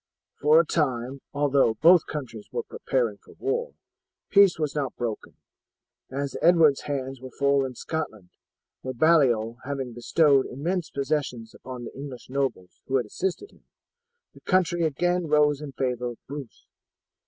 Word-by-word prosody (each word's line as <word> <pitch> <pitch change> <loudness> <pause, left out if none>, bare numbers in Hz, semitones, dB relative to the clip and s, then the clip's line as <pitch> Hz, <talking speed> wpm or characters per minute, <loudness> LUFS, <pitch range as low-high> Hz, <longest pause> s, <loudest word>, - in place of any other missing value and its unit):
For 150 +3 +6
a 170 - +3
time, 135 -4 -1
although 140 -5 +2
both 170 +7 +6
countries 125 -8 -6
were - - -2
preparing 115 -6 -2
for - - -18
war, 475 +5 -2 0.6
peace 200 -3 +6
was 155 -3 -2
not 140 -4 -2
broken, 115 -3 -5 0.7
as 140 +1 -4
Edward's 165 -5 +5
hands 135 -2 -3
were 130 - -8
full 140 +1 +2
in 130 -1 -5
Scotland, 110 - -5 0.5
where 130 0 -5
Baliol 120 -7 +3
having 135 -3 -4
bestowed 140 +3 +3
immense 170 +6 -3
possessions 135 -5 -2
upon 125 -1 -8
the - - -8
English 135 -2 -9
nobles 135 -10 -3
who 135 - -1
had 125 -3 +2
assisted 190 - -3
him, - - -25 0.7
the - - -17
country 175 -2 +2
again 175 +3 0
rose 150 -1 +3
in 150 -2 -6
favour 125 -2 -2
of 120 -1 -6
Bruce. 140 -4 -9
140 Hz, 150 wpm, -26 LUFS, 125-155 Hz, 0.7 s, For